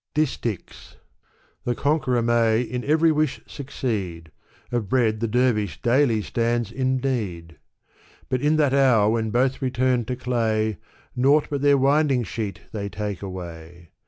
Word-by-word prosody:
DisUcks. 130 - -3 0.7
The 120 - -1
conqueror 135 -5 +1
may 115 -1 +3
in 125 +1 -4
every 160 +2 +4
wish 155 -2 0
succeed; 100 - -4 0.4
Of 120 -5 -2
bread 110 -4 +2
the 115 - -1
dervish 110 -4 +1
daily 120 -3 +2
stands 115 -1 -1
in 130 +1 0
need; 100 -11 -3 0.7
But 125 - -1
in 150 +2 +3
that 145 -3 +2
hour 125 -7 +4
when 110 -1 0
both 130 +4 +1
return 125 -2 +1
to 125 - -3
clay, 110 -4 0 0.4
Naught 140 +4 +3
but 140 -2 -1
their 145 0 +5
winding 135 -1 +3
sheet 105 -3 -5
they 100 -2 -4
take 100 0 -4
away. 85 -3 -9
120 Hz, 140 wpm, -23 LUFS, 105-130 Hz, 0.7 s, their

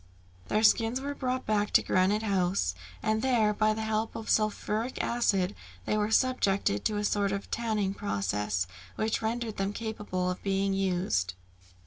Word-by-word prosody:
Their 215 - +1
skins 225 +3 +4
were 285 +1 -3
brought 255 -2 -2
back 210 -1 +1
to - - +6
Granite 195 +4 +2
House, 185 - +1 0.3
and 220 0 +1
there, 225 -5 +3
by 215 0 +2
the 220 - -3
help 220 0 -1
of 225 - -3
sulphuric 215 +2 0
acid, 200 -5 +1 0.3
they - - 0
were 210 0 +1
subjected 200 - +2
to 210 - +1
a 205 - -1
sort 205 -1 +1
of 200 0 -4
tanning 215 -4 0
process 100 - -1 0.3
which 220 0 0
rendered 225 0 -2
them 195 +1 -1
capable 205 -5 -2
of 180 - -6
being 195 0 0
used. 175 - 0
210 Hz, 160 wpm, -29 LUFS, 195-220 Hz, 0.3 s, to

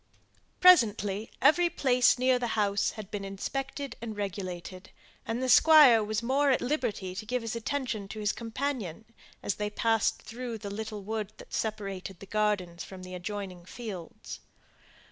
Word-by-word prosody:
Presently, 220 - +5
every 345 +3 +5
place 255 -8 +3
near 255 0 +3
the 245 - -1
house 200 -1 +2
had 215 -2 -9
been 205 -1 -4
inspected 270 +7 -4
and 220 -3 -6
regulated, 185 -2 -5 0.4
and 230 +3 -2
the - - 0
Squire 255 -3 +8
was 215 +2 -2
more 275 +4 +2
at 260 - +3
liberty 240 -9 -2
to 195 - -5
give 245 +2 -2
his 230 0 -3
attention 230 -3 -3
to 215 - -7
his 210 0 +1
companion, 230 - -4 0.4
as - - 0
they 210 - 0
passed 225 +1 +1
through 235 0 -6
the 200 -1 -7
little 210 0 -5
wood 215 0 -3
that - - -13
separated 195 -4 -4
the - - -10
gardens 195 -5 -1
from 185 -1 -10
the 185 0 -9
adjoining 185 -1 -5
fields. 190 -3 -8
215 Hz, 160 wpm, -29 LUFS, 195-245 Hz, 0.4 s, Squire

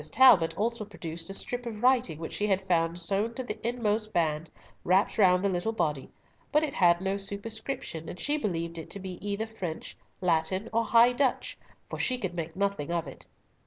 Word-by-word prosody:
Talbot 225 -10 +6
also 230 +1 -1
produced 165 -4 -7
a - - -4
strip 245 +3 -3
of 220 -1 -6
writing 250 - +3
which 160 0 -6
she 210 - -1
had 190 -1 +1
found 165 -1 +2
sewn 200 +6 0
to 260 - -3
the 220 -3 -5
inmost 220 -2 -1
band 160 -3 0 0.3
wrapped 190 +5 +2
round 180 -1 +5
the - - +3
little 185 +4 -1
body, 150 -9 -1 0.4
but 300 +1 +3
it 295 -3 -2
had 175 -1 +4
no 195 +1 0
superscription, 200 - -5
and 180 - -8
she 290 - 0
believed 170 - -2
it 160 - -8
to 200 - -6
be 185 -1 -7
either 205 +2 -2
French, 190 -8 -6 0.2
Latin, 185 +4 0
or 230 +1 +2
High 235 +2 +6
Dutch, 255 0 0 0.3
for - - -6
she 255 - +1
could 190 -7 -3
make 165 -1 -5
nothing 195 -5 -1
of 170 -2 0
it. - - -10
195 Hz, 200 wpm, -29 LUFS, 170-225 Hz, 0.4 s, Talbot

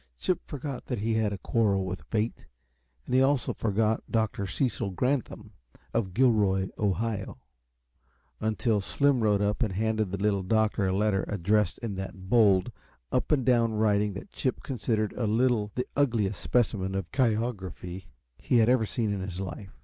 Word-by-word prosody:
Chip 180 - 0
forgot 140 -3 -5
that 120 -6 -2
he 115 +1 0
had 110 -2 +1
a 100 - -3
quarrel 100 -3 +1
with 95 0 -4
fate, 110 +1 -2 0.6
and - - -5
he 130 - +5
also 135 -1 +2
forgot 110 +1 0
Dr. 110 -3 0
Cecil 120 -1 -1
Granthum, 115 -1 -2 0.4
of 95 -6 -1
Gilroy, 105 -6 +3
Ohio 105 +1 -1 1.0
until 110 0 0
Slim 140 +5 +2
rode 105 -2 +2
up 105 +4 0
and 110 -6 +1
handed 110 0 0
the 100 - -3
Little 100 0 +1
Doctor 105 0 +1
a - - +1
letter 100 0 +1
addressed 105 -1 +1
in 105 -5 -3
that 95 0 -7
bold, 105 -3 +4 0.4
up 125 - 0
and 135 -5 +2
down 120 -3 +3
writing 105 -1 +2
that 95 - -9
Chip 130 - -2
considered 110 -4 -1
a 115 - -2
little 115 -1 +2
the 125 - -1
ugliest 115 -9 +1
specimen 100 -6 0
of 95 -3 -4
chirography 105 -7 -2 0.3
he 125 - +2
had 115 0 +5
ever 125 -4 +3
seen 110 -2 -1
in 100 - -3
his 95 -1 -5
life. 95 +1 -6
105 Hz, 165 wpm, -28 LUFS, 100-120 Hz, 1.0 s, he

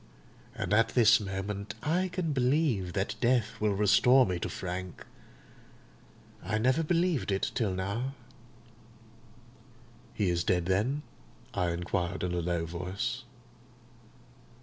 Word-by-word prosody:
And - - -2
at 115 +1 +3
this 110 -3 +6
moment 100 0 -4
I 175 +5 +1
can 180 -4 -2
believe 125 - +1
that 100 +1 -1
death 120 -3 +1
will 105 -2 +2
restore 110 +6 +5
me 90 -2 -2
to - - -3
Frank. 90 -1 -6 1.4
I 105 +4 -1
never 130 +8 +2
believed 170 - +1
it 95 - 0
till 110 -5 0
now." 110 +9 -3 2.0
"He 100 -4 +1
is 85 0 0
dead, 90 -2 +1
then?" 110 +11 0 0.5
I 90 -1 0
inquired 85 +1 -2
in 90 -1 -1
a 90 - 0
low 85 -1 -1
voice. 95 +9 -4
105 Hz, 125 wpm, -30 LUFS, 90-130 Hz, 2.0 s, this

